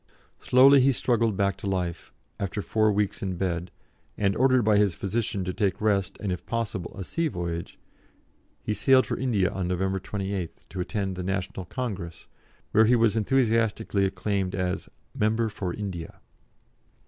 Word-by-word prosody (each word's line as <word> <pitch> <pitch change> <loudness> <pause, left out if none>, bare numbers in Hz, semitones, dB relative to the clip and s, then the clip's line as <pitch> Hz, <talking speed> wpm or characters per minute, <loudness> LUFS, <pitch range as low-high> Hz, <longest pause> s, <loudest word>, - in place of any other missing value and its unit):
Slowly 135 +2 +6
he 135 +1 +4
struggled 115 -4 +1
back 100 -2 +1
to - - -6
life, 90 -3 -3 0.3
after 100 +1 -3
four 110 -1 +2
weeks 105 -1 -1
in 95 -2 -2
bed, 90 -1 -2 0.5
and, 100 0 +1
ordered 130 -1 +4
by 105 -1 +4
his 100 -4 +3
physician 100 -1 -2
to 90 0 -3
take 100 -1 0
rest 100 -3 0
and 100 -3 -2
if 90 - -4
possible 115 -6 -3
a 95 - -4
sea 165 - -1
voyage, 85 - -4 0.9
he 105 - -1
sailed 130 +5 +4
for - - -2
India 110 -8 +1
on 95 -2 -3
November 95 +2 0
28th, 95 -2 -5
to 95 - -7
attend 95 0 -2
the 90 - -4
National 95 0 -3
Congress, 95 -10 -5 0.5
where 110 +1 +5
he 120 +3 +5
was 115 -2 +3
enthusiastically 115 -3 +1
acclaimed 95 0 -1
as 90 -1 -2 0.2
"Member 110 +2 +1
for 95 -4 -4
India." 95 -4 -6
100 Hz, 160 wpm, -26 LUFS, 95-110 Hz, 0.9 s, Slowly